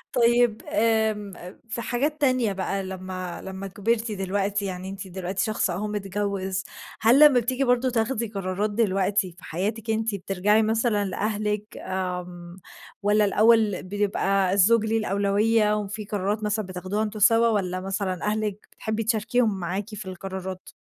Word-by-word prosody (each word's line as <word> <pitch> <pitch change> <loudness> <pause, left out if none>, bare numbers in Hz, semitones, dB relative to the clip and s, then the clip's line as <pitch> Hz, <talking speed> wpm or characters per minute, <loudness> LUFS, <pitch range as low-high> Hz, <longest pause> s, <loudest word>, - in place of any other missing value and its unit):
طيّب 240 -2 +3
آمم 220 -2 +1 0.4
في 235 +1 -3
حاجات 290 +7 -1
تانية 255 -6 +2
بقى 195 +1 -2
لمّا 185 -1 -6
لمّا 190 +1 -6
كبرتِ 220 +3 -1
دلوقتي، 200 +1 -1
يعني 185 -1 -4
أنتِ 195 0 -7
دلوقتي 185 +1 -2
شخص 215 -3 0
أهو 190 +5 -2
متجوز، 195 -2 -2 0.4
هل 240 +5 +5
لمّا 260 -4 +5
بتيجي 255 +3 0
برضو 250 0 +2
تاخدي 235 0 0
قرارات 200 0 -2
دلوقتي 195 -2 +1
في 175 - -18
حياتِك 215 +7 -3
أنتِ، 220 -1 0
بترجعي 200 +3 +2
مثلًا 220 -1 +1
لأهلِك 210 +1 -2
آمم 180 -1 -5 0.4
والّا 210 +1 +3
الأوّل 215 -1 +4
بيبقى 195 -1 0
الزوج 210 +3 +4
ليه 225 +1 +1
الأولوية، 210 +1 +2
وفي 210 +1 -4
قرارات 205 +1 -2
مثلًا 210 -1 -1
بتاخدوها 185 +3 -3
أنتم 215 0 -3
سوا 230 +2 +5
والّا 185 -4 0
مثلًا 190 -1 -3
أهلِك 210 -1 -2
بتحبي 220 0 -3
تشاركيهم 220 -2 +1
معاكِ 190 +4 -3
في 210 -2 -7
القرارات؟ 190 0 -6
205 Hz, 145 wpm, -25 LUFS, 190-220 Hz, 0.4 s, هل